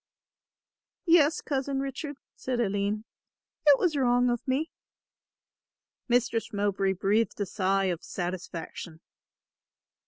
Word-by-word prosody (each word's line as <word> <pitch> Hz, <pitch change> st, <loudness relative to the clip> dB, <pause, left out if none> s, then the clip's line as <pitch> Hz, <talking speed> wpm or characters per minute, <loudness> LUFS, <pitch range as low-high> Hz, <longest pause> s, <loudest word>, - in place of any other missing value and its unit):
"Yes, 330 Hz, -3 st, +5 dB
Cousin 275 Hz, -1 st, -1 dB
Richard," 275 Hz, +1 st, -4 dB, 0.2 s
said 255 Hz, -2 st, -3 dB
Aline, 205 Hz, 0 st, 0 dB, 0.6 s
"it 285 Hz, -2 st, +9 dB
was 340 Hz, -2 st, +1 dB
wrong 245 Hz, -2 st, +3 dB
of 240 Hz, -, 0 dB
me." 280 Hz, +5 st, 0 dB, 1.4 s
Mistress 240 Hz, -2 st, +1 dB
Mowbray 200 Hz, -1 st, +1 dB
breathed 205 Hz, +5 st, +1 dB
a 205 Hz, -, +1 dB
sigh 195 Hz, 0 st, +1 dB
of 175 Hz, -3 st, -2 dB
satisfaction. 175 Hz, -2 st, -5 dB
230 Hz, 100 wpm, -28 LUFS, 195-270 Hz, 1.4 s, it